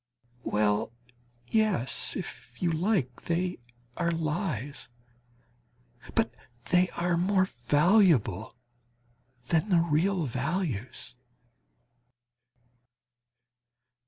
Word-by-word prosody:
Well 105 +1 +1 0.6
yes, 215 - +2
if - - -8
you 175 -2 +1
like, 160 - 0
they 175 +2 -1 0.4
are 170 -1 +1
lies; 155 - -2 1.3
but - - +2 0.4
they 180 +1 +4
are 175 0 +1
more 190 +2 +3
valuable 145 - +3 0.9
than 170 +5 +2
the 180 - +4
real 170 +2 +2
values. 130 - -3
165 Hz, 70 wpm, -28 LUFS, 130-185 Hz, 1.3 s, they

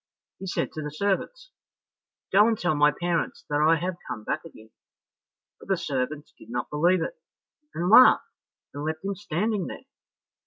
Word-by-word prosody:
He 190 - -7
said 180 - -2
to 155 - -6
the 150 - -4
servants, 205 - -2 0.8
"Go 205 +3 +6
and 225 -1 +1
tell 175 -4 0
my 150 0 +4
parents 175 +2 -2
that 145 0 +2
I 160 +2 +5
have 175 +2 -3
come 110 - -5
back - - -3
again." 110 -9 -14 0.9
But - - -14
the 195 -1 +1
servants 145 0 -3
did 110 - -15
not 120 0 -4
believe 175 +5 +2
it, - - -6 0.6
and 175 +2 -1
laughed 230 +6 +7 0.5
and 145 - -6
left 155 +3 -4
him 200 - -1
standing 200 +1 -2
there. - - -9
170 Hz, 170 wpm, -26 LUFS, 150-195 Hz, 0.9 s, laughed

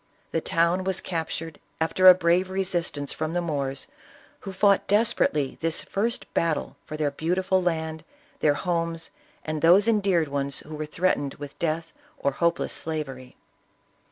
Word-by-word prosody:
The 165 - 0
town 170 +4 +1
was 190 0 0
cap 165 -3 -3
tured 160 -1 -5 0.2
after 175 +3 +3
a 180 - +10
brave 180 +1 +2
resistance 175 -6 -2
from 155 +1 -3
the 175 - +1
Moors, 140 -5 -2 0.5
who 195 - -7
fought 200 +1 +3
desperately 195 - +1
this 165 0 0
first 230 +4 -2
battle 165 -2 0
for 155 - -5
their 150 -2 0
beautiful 185 +5 0
land, 160 -2 -2 0.4
their 145 -1 +3
homes, 165 -1 -2 0.3
and 155 -1 -3
those 185 +6 +6
endeared 195 -7 +2
ones 140 0 -1
who 155 - -11
were 155 0 -4
threatened 150 -4 0
with 145 -1 -10
death 165 0 -2 0.2
or 140 - 0
hopeless 170 +4 0
slavery. 135 -6 -5
165 Hz, 155 wpm, -26 LUFS, 155-185 Hz, 0.5 s, a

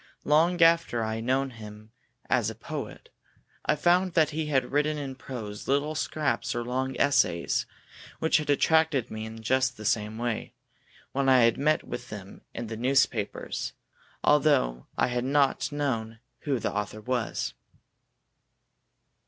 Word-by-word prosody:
Long 165 +4 +3
after 165 -8 +3
I 110 0 -2
had 115 - -5
known 135 +2 +1
him 110 -1 -11 0.4
as - - +2
a - - -7
poet, - - -7 0.6
I 150 - +4
found 175 +4 +2
that 160 -2 +3
he 155 0 -2
had 135 -3 +1
written 150 +2 +1
in 140 -2 -4
prose 115 -6 -7
little 145 +3 +1
scraps 145 -6 -1
or 120 - -1
long 130 +2 -2
essays, 85 -11 +2 0.5
which 160 - +3
had 150 -2 -4
attracted 155 -2 +3
me 110 0 -5
in 110 0 -10
just 130 +1 +1
the 110 - -8
same 110 -1 0
way, 120 -1 -3 0.6
when 135 0 +1
I 130 -1 +6
had 115 +2 +3
met 155 +2 +2
with 120 - -7
them 100 -2 -9
in 120 - -5
the 110 0 -6
newspapers, 125 -4 0 0.5
although 140 - +3
I - - +3
had 120 -1 -1
not 135 0 +2
known 115 -6 -2 0.3
who 140 -3 +1
the 115 - -2
author 105 +1 -3
was. 120 0 -2
130 Hz, 155 wpm, -27 LUFS, 115-145 Hz, 0.6 s, I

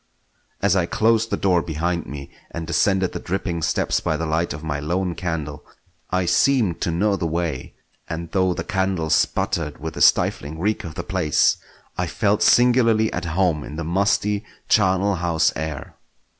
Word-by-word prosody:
As 100 -2 +3
I 90 -3 +1
closed 115 +2 +2
the - - -1
door 90 -3 +2
behind 85 +2 -2
me 70 -1 -8 0.2
and 85 -1 -6
descended 95 +3 +1
the - - -5
dripping 90 -2 -3
steps - - 0
by 80 - -1
the 80 - -2
light 80 +2 0
of 75 +2 -6
my 75 -2 -2
lone 90 +4 -1
candle, 80 -3 -4 0.5
I 90 0 0
seemed 110 0 +2
to - - 0
know 100 +5 +1
the 85 -4 -2
way; 80 -5 -3 0.3
and 85 0 -5
though 95 -2 +1
the - - -3
candle 95 -5 -1
sputtered 75 -5 0
with 80 +1 -6
the - - -6
stifling 75 +3 +3
reek 105 +5 -1
of 80 -2 -8
the - - -4
place, 90 -6 +2 0.4
I - - 0
felt - - 0
singularly 120 -3 +4
at 90 - -3
home 85 -2 0
in 75 - -8
the 85 - -4
musty, 100 +4 +1 0.2
charnel 95 -1 +2
house 85 -2 +1
air. 80 -3 -5
85 Hz, 175 wpm, -22 LUFS, 80-95 Hz, 0.5 s, singularly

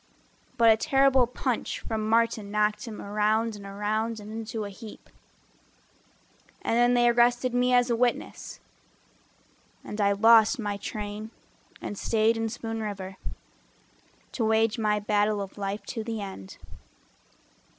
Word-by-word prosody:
But 230 -2 +6
a 220 - +4
terrible 270 0 +3
punch 250 0 -3
from 220 -1 -3
Martin 230 -2 +1
knocked 210 +2 0
him 220 -3 -8
Around 215 +2 0
and 200 -1 -10
around 215 +3 -2
and 210 0 -10
into 220 0 -5
a 200 - -7
heap. 215 +2 -12 1.5
And - - 0
then 240 +1 +4
they 240 0 +4
arrested 240 +1 +3
me 250 +1 +2
as 245 0 +3
a - - +3
witness, 240 0 -2 1.2
And 210 - -5
I 200 0 +3
lost 225 +4 +5
my 205 -3 -3
train 210 +1 -6 0.5
and 205 - -5
staid 225 0 +2
in 225 0 -2
Spoon 225 0 -5
River 195 -3 -6 1.1
To 235 - -2
wage 220 +1 +2
my 210 -1 +1
battle 210 0 +1
of 195 -1 -6
life 200 0 -4
to 225 -3 -4
the 225 0 -4
end. 190 - -8
220 Hz, 140 wpm, -27 LUFS, 210-230 Hz, 1.5 s, But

